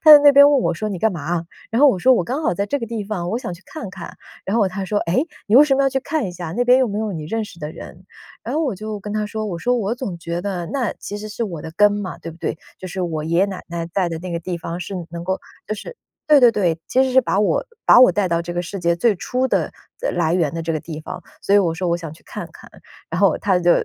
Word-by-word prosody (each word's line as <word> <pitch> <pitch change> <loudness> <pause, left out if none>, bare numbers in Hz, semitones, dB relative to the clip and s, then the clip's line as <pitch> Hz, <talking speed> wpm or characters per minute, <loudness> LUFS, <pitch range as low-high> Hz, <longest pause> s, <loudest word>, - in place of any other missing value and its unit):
他 310 - +8
在 300 - +12
那 285 0 +7
边 285 +1 +8
问 285 -2 +4
我 - - +1
说： 215 +5 -3
“你 195 -3 -4
干 220 +3 +2
嘛 170 - -5
啊？” 170 +2 -1 0.3
然 225 - 0
后 290 - +7
我 240 - +2
说： 255 +8 +5
“我 180 - +1
刚 270 - -3
好 295 - +1
在 200 +3 -1
这 285 +8 -1
个 230 - -4
地 225 -2 -4
方， 185 -4 -3
我 220 - -1
想 215 - -5
去 175 +1 -11
看 230 -12 -7
看。 - - -9 0.3
“然 200 - 0
后 220 - +4
哦 - - +1
他 190 +2 -5
说：” 205 +2 +1
诶？ 190 - +1 0.2
你 210 - +2
为 280 - +10
什 295 -2 +3
么 275 - +2
要 270 - +2
去 265 0 0
看 300 +1 -1
一 180 - -4
下， 175 -2 -6
那 245 - +2
边 250 +1 +6
又 255 - +2
没 205 0 -3
有 215 -1 -2
你 160 -4 -5
认 225 +6 -2
识 190 - -13
的 150 -2 -5
人。 180 +3 -11 0.4
“然 240 - -4
后 315 - +1
我 270 -8 -1
就 215 +2 -5
跟 205 +1 -6
他 215 0 -1
说， 215 +1 -4
我 185 -5 -4
说： 245 +7 +1
“我 220 -1 -1
总 240 -8 -5
觉 170 0 -4
得 185 -3 -3
那 260 -5 -1
其 205 - -6
实 215 +1 -7
是 225 +3 -3
我 170 -7 -5
的 160 - -7
根 205 0 +5
嘛， 195 -6 -4
对 165 - -8
不 165 - -17
对？ - - -2 0.2
就 185 - -7
是 185 +1 -4
我 160 -3 -2
爷 170 +2 +1
爷 - - +5
奶 195 -2 -5
奶 170 -1 -3
待 175 +2 -1
的 165 - -4
那 180 0 -6
个 170 - -2
地 175 +1 -4
方 170 +1 -5
是 195 - -6 0.2
能 170 0 -6
够， 190 +2 -1 0.3
就 215 - -2
是 215 - -8 0.3
“对 300 -2 +6
对 245 -2 +7
对。 175 -7 +1
其 260 - +3
实 260 - -1
是 260 - +6
把 215 -5 0
我 210 - +1 0.2
把 - - +8
我 255 - +8
带 205 -2 +1
到 170 0 0
这 175 0 -5
个 175 - 0
世 190 +3 -6
界 170 0 +2
最 220 +4 +3
初 255 +7 -1
的 - - 0 0.3
的 - - 0
来 165 -1 +1
源 165 -5 +1
的 165 - -3
这 165 0 -2
个 155 - -2
地 155 -1 -7
方， - - -7 0.2
所 200 - +2
以 - - +8
我 175 -5 +2
说： 180 +2 -3
“我 170 - +2
想 165 -3 -7
去 160 - -16
看 - - -7
看。” - - -14 0.4
然 170 - -2
后 195 -4 +4
他 190 -3 +2
就 175 0 +3
200 Hz, 340 characters per minute, -21 LUFS, 170-235 Hz, 0.4 s, 在